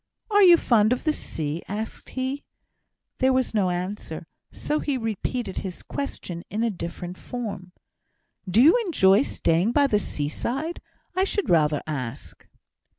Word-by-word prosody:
"Are 410 0 +5
you 350 -3 +9
fond 225 -5 +3
of 250 - -4
the 310 - +2
sea?" 155 - -4
asked 215 +3 -5
he. 260 +2 -2 0.8
There 260 0 +4
was 260 -2 +1
no 200 -4 +2
answer, 180 +4 -4 0.3
so 300 - -2
he 285 -3 -1
repeated 225 -1 -3
his 185 -3 -5
question 175 -11 -5
in 220 +3 -1
a 230 - +1
different 175 0 -6
form. 205 -7 -6 0.8
"Do 220 +7 +5
you 320 - +7
enjoy 205 - +4
staying 185 -4 +1
by 290 -1 +5
the 215 -7 +2
seaside? 240 - -3 0.3
I 375 - +3
should 395 0 0
rather 150 -3 +3
ask." 130 -7 -6
220 Hz, 150 wpm, -25 LUFS, 180-270 Hz, 0.8 s, you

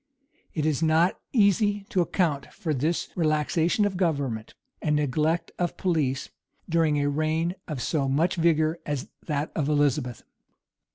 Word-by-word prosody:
[] - - -38
It 155 -2 0
is 155 -1 +1
not 165 +3 +3
easy 205 -2 +3
to 195 -7 +2
account 160 -6 0
for 160 -3 -3
this 155 +5 -1
relaxation 160 +4 +2
of 195 -3 -1
government, 140 - -1 0.3
and 150 -1 +1
neglect 150 +3 0
of 175 -1 -1
police, 145 -7 0 0.4
during 160 -3 +2
a 145 - +1
reign 155 +4 0
of 145 -6 -4
so 140 -4 0
much 160 +7 +2
vigor 165 -1 +2
as 145 -3 -3 0.2
that 150 -1 -1
of 150 -2 0
Elizabeth. 145 -5 +1
155 Hz, 150 wpm, -26 LUFS, 145-170 Hz, 0.4 s, not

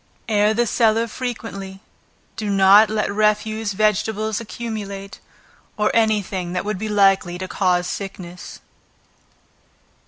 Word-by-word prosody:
Air 210 -1 +2
the 240 +1 +2
cellar 225 0 +2
frequently; 215 -5 -6 0.6
do 215 -2 -4
not 200 +2 +6
let 215 -2 -1
refuse 215 0 0
vegetables 215 +1 0
accumulate, 205 -4 -6 0.6
or 210 0 +2
any 220 -2 +2
thing 180 -2 -5
that 180 - -2
would 210 -2 -3
be 215 +1 -3
likely 195 -4 +3
to 185 +1 -5
cause 180 -2 +1
sickness. 180 -2 -7
210 Hz, 120 wpm, -21 LUFS, 195-220 Hz, 0.6 s, not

